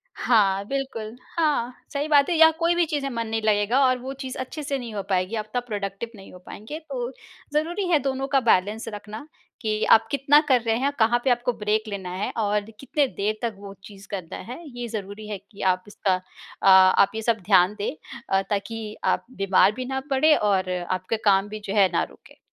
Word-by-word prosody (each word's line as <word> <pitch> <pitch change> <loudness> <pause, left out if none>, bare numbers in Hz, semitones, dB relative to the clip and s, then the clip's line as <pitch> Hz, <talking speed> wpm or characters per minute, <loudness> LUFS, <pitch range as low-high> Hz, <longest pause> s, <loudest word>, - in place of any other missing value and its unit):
हाँ, 200 -4 +2
बिल्कुल। 245 -5 -4 0.2
हाँ, 290 -7 +1 0.2
सही 285 +2 -1
बात 290 -1 +4
है, 350 - +1
या 320 0 +8
कोई 340 +1 +2
भी 345 0 +3
चीज़ 295 -3 -2
में 275 - -2
मन 230 -1 -2
नहीं 225 0 -2
लगेगा 215 +3 +2
और 255 0 +3
वो 260 +2 -6
चीज़ 260 -2 -5
अच्छे 260 +4 -5
से 275 -1 -2
नहीं 240 -4 -7
हो 200 - -3
पाएगी, 185 +3 0
आप 215 -1 -5
तब 245 0 -1
एक्टिविटी 205 +3 -5
नहीं 195 - -13
हो 180 - -12
पाएँगे। 225 +10 -8
तो 250 -2 -3 0.4
ज़रूरी 345 +6 0
है 325 -4 +4
दोनों 270 0 -2
का 275 -1 +3
बैलेंस 220 -1 +1
रखना 210 +6 -8 0.3
कि 215 -2 -1
आप 225 0 +6
कितना 280 +1 +5
कर 255 -2 +5
रहे 225 -1 0
हैं, 275 +2 +1
कहाँ 230 +2 +4
पे 265 - +2
आपको 245 0 +1
ब्रेक 215 0 0
लेना 195 -3 -5
है, 195 - -2
और 210 -1 0
कितने 275 +2 0
देर 215 -2 -2
तक 230 -3 -2
वो 200 -1 -9
चीज़ 200 -1 -13
करना 185 -5 -5
है। 255 - -7 0.2
ये 240 - -3
ज़रूरी 210 -1 -6
है 210 -2 -4
कि 200 +1 -15
आप 185 -1 +1
इसका 195 -2 0
अ, 185 +1 -7
आप 190 +1 +6
ये 220 - -2
सब 225 0 +1
ध्यान 190 -1 +5
दें 205 - -1 0.4
अ, 195 0 +3
ताकि 215 +1 -3
आप - - +1
बीमार 195 0 +4
भी 255 0 -4
ना 265 +1 -2
पड़े 300 +3 +4
और 195 -5 +1
आपके 185 +4 -2
काम 195 -1 +4
भी 215 +1 -6
जो 195 - -2
है 195 -2 +5
ना - - +2
रुके। - - -19
220 Hz, 220 wpm, -24 LUFS, 200-265 Hz, 0.4 s, या